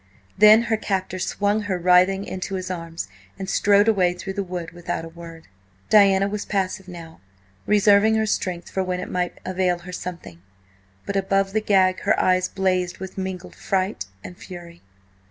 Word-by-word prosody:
Then 215 Hz, +2 st, +7 dB
her 225 Hz, -1 st, 0 dB
captor 190 Hz, -3 st, -3 dB
swung 205 Hz, +3 st, 0 dB
her 200 Hz, -3 st, -2 dB
writhing 180 Hz, +2 st, +3 dB
into 190 Hz, +1 st, -5 dB
his 185 Hz, 0 st, -4 dB
arms, 165 Hz, -2 st, -5 dB, 0.3 s
and 190 Hz, -1 st, -6 dB
strode 205 Hz, +2 st, +3 dB
away 185 Hz, -5 st, +3 dB
through 195 Hz, +2 st, -6 dB
the 200 Hz, -, -2 dB
wood 180 Hz, -3 st, -5 dB
without 175 Hz, -1 st, -5 dB
a -, -, -9 dB
word. 165 Hz, -1 st, -12 dB, 0.4 s
Diana 195 Hz, -2 st, +5 dB
was 205 Hz, +1 st, -4 dB
passive 190 Hz, -1 st, -2 dB
now, 170 Hz, -3 st, -11 dB, 0.5 s
reserving 210 Hz, +1 st, +4 dB
her 220 Hz, 0 st, +1 dB
strength 180 Hz, -4 st, -2 dB
for 190 Hz, -, -1 dB
when 180 Hz, -1 st, -2 dB
it 180 Hz, -, -6 dB
might 180 Hz, -1 st, -2 dB
avail 185 Hz, -1 st, 0 dB
her 175 Hz, +1 st, -10 dB
something, 175 Hz, -, -7 dB, 0.6 s
but 200 Hz, -, -4 dB
above 195 Hz, 0 st, +1 dB
the 220 Hz, -, +1 dB
gag 190 Hz, -3 st, +3 dB
her -, -, +1 dB
eyes 185 Hz, 0 st, +2 dB
blazed 185 Hz, -2 st, -1 dB
with 190 Hz, 0 st, -8 dB
mingled 190 Hz, -1 st, -5 dB
fright 190 Hz, -, -2 dB, 0.2 s
and 180 Hz, -, -10 dB
fury. 175 Hz, -1 st, -11 dB
185 Hz, 175 wpm, -23 LUFS, 180-200 Hz, 0.6 s, Then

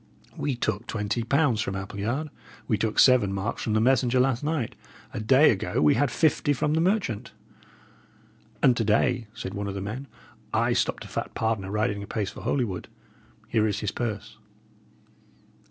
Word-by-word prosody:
"We 140 Hz, -3 st, -2 dB
took 120 Hz, -1 st, -2 dB
twenty 105 Hz, +2 st, -2 dB
pounds 125 Hz, -1 st, +2 dB
from 95 Hz, -, -3 dB
Appleyard. 105 Hz, +10 st, -3 dB, 0.4 s
We 115 Hz, -, +2 dB
took 110 Hz, +1 st, -2 dB
seven 125 Hz, -7 st, +6 dB
marks 100 Hz, +4 st, -3 dB
from 110 Hz, -, -1 dB
the 110 Hz, -, +3 dB
messenger 125 Hz, +1 st, +3 dB
last 130 Hz, 0 st, +1 dB
night. 150 Hz, -6 st, -1 dB, 0.4 s
A -, -, -3 dB
day 130 Hz, +7 st, +5 dB
ago 95 Hz, -4 st, -1 dB
we 75 Hz, -1 st, +5 dB
had 145 Hz, -, +2 dB
fifty 145 Hz, +1 st, +2 dB
from 150 Hz, +2 st, 0 dB
the 160 Hz, -, +2 dB
merchant." 175 Hz, -, 0 dB, 1.3 s
"And 125 Hz, -2 st, +6 dB
to 115 Hz, -, +1 dB
day," 115 Hz, +2 st, +2 dB
said 95 Hz, -4 st, -6 dB
one 100 Hz, 0 st, -3 dB
of 100 Hz, -, -4 dB
the -, -, -3 dB
men, 110 Hz, +8 st, -5 dB, 0.5 s
"I -, -, +2 dB
stopped -, -, -1 dB
a -, -, -9 dB
fat -, -, -5 dB
pardoner 110 Hz, -4 st, -1 dB
riding 105 Hz, 0 st, -1 dB
apace 100 Hz, 0 st, -3 dB
for -, -, -10 dB
Holywood. 115 Hz, -10 st, -1 dB, 0.6 s
Here 110 Hz, -1 st, +2 dB
is 105 Hz, 0 st, -2 dB
his 105 Hz, -, -1 dB
purse." 110 Hz, -4 st, -4 dB
115 Hz, 170 wpm, -26 LUFS, 105-130 Hz, 1.3 s, seven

